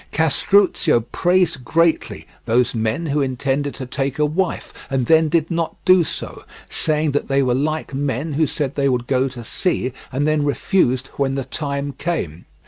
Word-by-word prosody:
Castruccio 160 -2 +3
praised 175 -6 +1
greatly 165 +5 +1 0.2
those 120 +2 +2
men 115 +7 -1
who 150 -1 0
intended 135 +2 -1
to 130 - -6
take 135 +1 -3
a 150 - +3
wife 170 +5 -2 0.2
and 135 -3 0
then 160 +3 +4
did 165 +1 +1
not 165 -1 -1
do 185 -1 +6
so, - - -6 0.2
saying 155 -1 0
that 145 - -1
they 140 0 +2
were 125 -2 +1
like 150 +3 -2
men 140 +2 -2
who 155 +2 +2
said 140 -2 -3
they 140 -1 +1
would 125 -2 0
go 130 +1 +1
to 125 -3 -8
sea, 130 -1 -1 0.2
and 135 +2 0
then 155 -1 +2
refused 140 -3 +1
when 135 -1 0
the 135 -2 -3
time 140 -1 -3
came. 90 - -3
140 Hz, 175 wpm, -20 LUFS, 130-160 Hz, 0.2 s, do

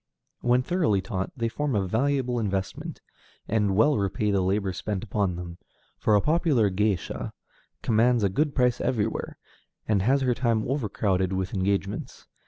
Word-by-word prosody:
When 125 +1 +2
thoroughly 160 - +1
taught, 95 0 -3
they 115 -1 0
form 140 +2 -2
a 100 -2 +1
valuable 125 +3 0
investment, 95 -3 -3 0.5
and 105 -3 +1
well 115 +5 +4
repay 100 +1 0
the 100 -1 +2
labor 95 +1 0
spent 100 +3 -3
upon 100 -4 -1
them, 85 0 -7 0.4
for 105 - +3
a 100 - +4
popular 150 - +2
géisha 100 -2 -1 0.5
commands 115 +1 +3
a 100 - +3
good 145 +9 0
price 125 -2 +2
everywhere, 110 -3 -1 0.5
and 105 -3 +2
has 135 +7 +3
her 130 -2 +2
time 115 -2 0
overcrowded 100 -7 0
with 95 -1 -2
engagements. 100 +1 -2
105 Hz, 155 wpm, -26 LUFS, 95-125 Hz, 0.5 s, well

